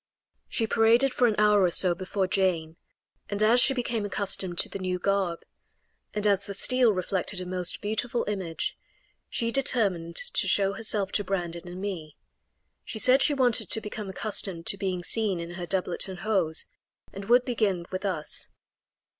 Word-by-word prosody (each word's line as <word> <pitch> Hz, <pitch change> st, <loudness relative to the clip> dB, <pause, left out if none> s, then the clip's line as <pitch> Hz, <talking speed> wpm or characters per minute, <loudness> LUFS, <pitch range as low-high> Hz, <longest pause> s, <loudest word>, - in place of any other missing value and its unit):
She 225 Hz, -, -1 dB
paraded 230 Hz, +4 st, +3 dB
for 245 Hz, -, +3 dB
an 220 Hz, -, 0 dB
hour 210 Hz, -1 st, +4 dB
or 180 Hz, -, +4 dB
so 175 Hz, +1 st, +3 dB
before 185 Hz, +2 st, -2 dB
Jane, 180 Hz, -4 st, 0 dB, 0.5 s
and 205 Hz, +1 st, -1 dB
as 230 Hz, +3 st, +5 dB
she 270 Hz, -, +6 dB
became 235 Hz, -3 st, -2 dB
accustomed 195 Hz, -3 st, 0 dB
to -, -, +3 dB
the 195 Hz, -, -7 dB
new 185 Hz, -1 st, -2 dB
garb, 190 Hz, -2 st, -1 dB, 0.7 s
and 210 Hz, 0 st, -1 dB
as 200 Hz, -1 st, +2 dB
the 200 Hz, -, -5 dB
steel 255 Hz, +2 st, +3 dB
reflected 185 Hz, 0 st, -2 dB
a 185 Hz, -, -5 dB
most 180 Hz, -1 st, -3 dB
beautiful 230 Hz, +3 st, -2 dB
image, 190 Hz, -6 st, -3 dB, 0.5 s
she 230 Hz, 0 st, -1 dB
determined 200 Hz, -11 st, 0 dB
to 190 Hz, -, -1 dB
show 195 Hz, +1 st, +2 dB
herself 205 Hz, -2 st, 0 dB
to 205 Hz, -, 0 dB
Brandon 175 Hz, -3 st, -4 dB
and 180 Hz, +1 st, -8 dB
me. 170 Hz, -7 st, -6 dB, 0.7 s
She -, -, -6 dB
said 255 Hz, +5 st, +4 dB
she 290 Hz, -, +3 dB
wanted 245 Hz, -6 st, +2 dB
to -, -, +2 dB
become 210 Hz, -1 st, -7 dB
accustomed 190 Hz, -3 st, 0 dB
to -, -, +2 dB
being 185 Hz, -2 st, -3 dB
seen 205 Hz, -3 st, 0 dB
in 170 Hz, 0 st, -6 dB
her 175 Hz, 0 st, -6 dB
doublet 185 Hz, 0 st, 0 dB
and 185 Hz, -1 st, -8 dB
hose, 190 Hz, -7 st, 0 dB, 0.5 s
and 195 Hz, 0 st, -7 dB
would 245 Hz, +3 st, +4 dB
begin 200 Hz, -8 st, -1 dB
with 185 Hz, +1 st, -4 dB
us. 170 Hz, -7 st, +1 dB
195 Hz, 175 wpm, -27 LUFS, 180-220 Hz, 0.7 s, she